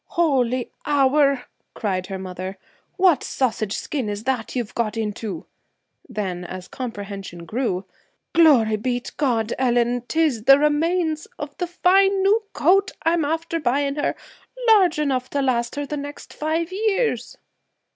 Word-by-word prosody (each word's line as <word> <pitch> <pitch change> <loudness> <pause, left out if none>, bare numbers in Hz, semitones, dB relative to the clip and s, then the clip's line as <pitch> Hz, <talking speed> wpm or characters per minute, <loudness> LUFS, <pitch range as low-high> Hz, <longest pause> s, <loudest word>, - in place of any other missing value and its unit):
'Holy 255 -7 +1 0.2
hour!' 280 -2 +3 0.3
cried 185 -4 -2
her 195 -1 -4
mother. 185 0 -6 0.4
'What 365 -7 +4
sausage 220 -5 -1
skin 265 -8 -3
is 205 +1 -4
that 250 -2 -2
you've 240 -4 -3
got 230 -1 -1
into?' 210 -4 -4 0.6
Then, 185 -4 -3
as 180 +1 -7
comprehension 200 -7 -7
grew: 200 -1 -2 0.5
'Glory 270 -11 +5
b' 245 +3 -1
t' 240 - -9
God, 235 -6 0
Ellen! 245 -1 +2
'tis 300 -9 +1
the 275 +1 +8
remains 310 +2 +1
of 290 -1 -6
the 355 - -2
fine 385 +2 +3
new 415 +3 +4
coat, 385 +5 +3
I'm 330 0 +2
after 325 +2 -1
buying 280 0 +1
her, 290 - 0 0.5
large 380 -7 +5
enough 265 -4 0
to 285 - -1
last 240 -2 0
her 290 0 -2
the 295 +1 -4
next 285 0 -8
five 320 +3 -2
years!' 430 +4 0
265 Hz, 145 wpm, -22 LUFS, 220-320 Hz, 0.6 s, the